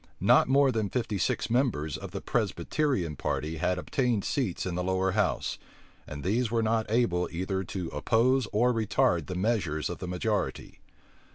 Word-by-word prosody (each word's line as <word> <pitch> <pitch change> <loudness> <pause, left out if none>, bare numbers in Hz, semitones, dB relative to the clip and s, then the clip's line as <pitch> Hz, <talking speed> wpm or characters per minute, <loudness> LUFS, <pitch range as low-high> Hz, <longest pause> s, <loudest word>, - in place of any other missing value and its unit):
Not - - +5
more 135 0 +5
than 110 -4 -1
fifty 115 -4 -2
six - - 0
members 115 - 0
of - - -7
the - - -6
Presbyterian 115 - -1
party 80 +3 -2
had 90 +3 0
obtained 120 +2 0
seats 120 -11 -1
in 95 - -2
the 90 +1 -2
lower 95 +1 +1
house; 100 -2 0 0.2
[*] - - -30
and 75 -2 -7
these 115 +5 +1
were 115 0 +1
not 110 0 0
able 105 -7 +1
either 95 +2 -2
to 90 0 -4
oppose 120 - +2
or 120 +4 +3
retard 95 -7 +1
the 90 - -4
measures 90 -7 0
of 85 - -6
the 90 - -5
majority. 90 -2 -2
100 Hz, 175 wpm, -28 LUFS, 90-120 Hz, 0.2 s, Not